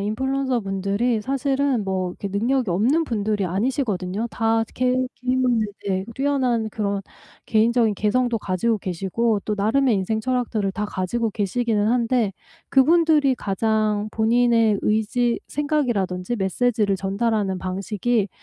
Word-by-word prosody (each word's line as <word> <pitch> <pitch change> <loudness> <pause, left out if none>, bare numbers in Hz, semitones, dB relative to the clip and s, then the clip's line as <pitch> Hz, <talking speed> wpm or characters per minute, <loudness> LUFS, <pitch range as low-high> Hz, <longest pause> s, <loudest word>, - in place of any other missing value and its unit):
인플루언서분들이 220 -2 -1
사실은 270 -2 0
뭐 190 -1 -1
이렇게 200 +2 -6
능력이 230 +2 0
없는 255 - +2
분들이 210 -4 -1
아니시거든요. 205 - -1
다 225 0 +1
개 255 0 +1 0.2
개인 255 +1 -1
분들 235 -4 +2 0.2
네. 190 -1 -1
뛰어난 255 -5 0
그런 200 -2 -2 0.4
개인적인 225 0 +2
개성도 235 +3 +1
가지고 210 +3 0
계시고 195 +5 -1
또 210 - -1
나름의 225 +5 +2
인생철학들을 220 0 -1
다 210 +1 -3
가지고 210 +5 -2
계시기는 210 +1 0
한데 235 -3 +1 0.4
그분들이 300 -1 +4
가장 215 0 0
본인의 230 -1 +3
의지 230 +3 +1
생각이라든지 240 -9 -1
메시지를 205 +1 +1
전달하는 195 0 -1
방식이 200 +4 -1
220 Hz, 330 characters per minute, -22 LUFS, 200-250 Hz, 0.4 s, 그분들이